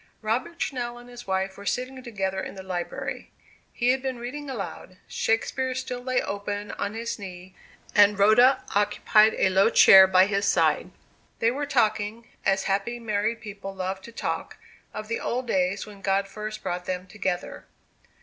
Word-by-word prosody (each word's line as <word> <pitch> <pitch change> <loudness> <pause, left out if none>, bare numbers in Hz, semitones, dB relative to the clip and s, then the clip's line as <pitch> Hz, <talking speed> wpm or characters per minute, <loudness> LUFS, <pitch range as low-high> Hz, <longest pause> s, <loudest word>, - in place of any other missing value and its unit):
Robert 255 +11 -1
Channell 240 -5 -3
and 245 - -14
his 245 -2 -11
wife 190 0 -1
were 200 - -11
sitting 255 +1 -2
together 195 -6 -3
in - - -7
the 190 - -8
library. 190 +9 -5 0.4
He 240 0 0
had 260 +1 +2
been 260 -2 -3
reading 275 +5 -6
aloud: 195 -6 -6
Shakespeare 255 +3 -1
still 255 -1 -4
lay 255 0 0
open 205 +1 -4
on 205 +2 -4
his 230 0 -4
knee, 185 -1 -9 0.4
and 205 -1 +6
Rhoda 230 +6 +5
occupied 210 +1 +4
a - - +3
low 195 +3 +4
chair 190 -4 +9
by 185 0 +5
his 200 0 0
side. - - +2 0.5
They 230 - +2
were 285 +3 -3
talking, 220 -3 0 0.2
as 195 0 +2
happy 200 +5 -1
married 220 0 -1
people 200 -2 -8
love 190 +1 -3
to 235 - -11
talk, - - -4 0.3
of 215 0 -7
the 230 - -2
old 250 +2 -2
days 190 -3 0
when 205 -2 -13
God 195 0 +1
first 215 +1 -7
brought 180 0 -3
them 185 0 -3
together. 185 -2 -4
210 Hz, 170 wpm, -26 LUFS, 195-240 Hz, 0.5 s, chair